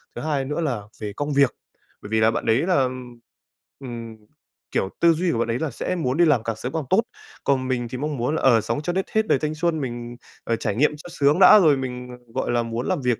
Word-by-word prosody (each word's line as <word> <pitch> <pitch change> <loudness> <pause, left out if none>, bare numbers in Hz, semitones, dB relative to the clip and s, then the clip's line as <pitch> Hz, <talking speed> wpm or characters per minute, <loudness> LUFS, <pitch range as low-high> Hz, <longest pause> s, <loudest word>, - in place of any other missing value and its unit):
Thứ - - -5
2 145 -3 -1
nữa 150 +4 -2
là 130 -9 -1 0.2
về 105 -2 -5
công 145 +3 -2
việc, 140 -2 +3 0.5
bởi 105 - -9
vì 110 0 +1
là 110 +1 +4
bạn 115 - -3
đấy 115 +3 +3
là, 185 - +3
ừm, 125 -2 -6 0.6
ừm, 120 -4 -7 0.6
kiểu, 95 - 0
tư 170 0 +5
duy 170 +2 0
của - - -1
bạn 115 - 0
ấy 115 +1 -1
là 160 -3 -2
sẽ 180 +9 -3
muốn 135 -6 -1
đi 175 - +5
làm 145 -8 +3
càng 115 -1 -2
sớm 125 +4 -6
càng 160 - -1
tốt. 195 - +4 0.4
Còn 130 -2 +1
mình 125 -2 -1
thì 125 - -5
mong 150 +2 -3
muốn 125 +6 -1
là, - - -2
ờ, 120 -4 +5
sống 145 - -2
cho 175 +3 -2
đến 190 +1 0
hết 220 0 +1
đời - - +3
thanh 155 0 -2
xuân, 165 0 0
mình, 120 -2 -5 0.3
ờ, 115 - 0
trải 110 -3 -2
nghiệm 145 +7 +3
cho 155 - -11
sướng 145 0 +2
đã 190 +2 +9
rồi 155 -7 +4
mình, 125 -1 -5
ờ, 125 - -8 0.2
gọi 130 - -1
là, 120 -1 +1
muốn 115 +2 -4
làm 185 -6 0
việc, 125 -3 0
130 Hz, 270 wpm, -23 LUFS, 120-155 Hz, 0.6 s, đã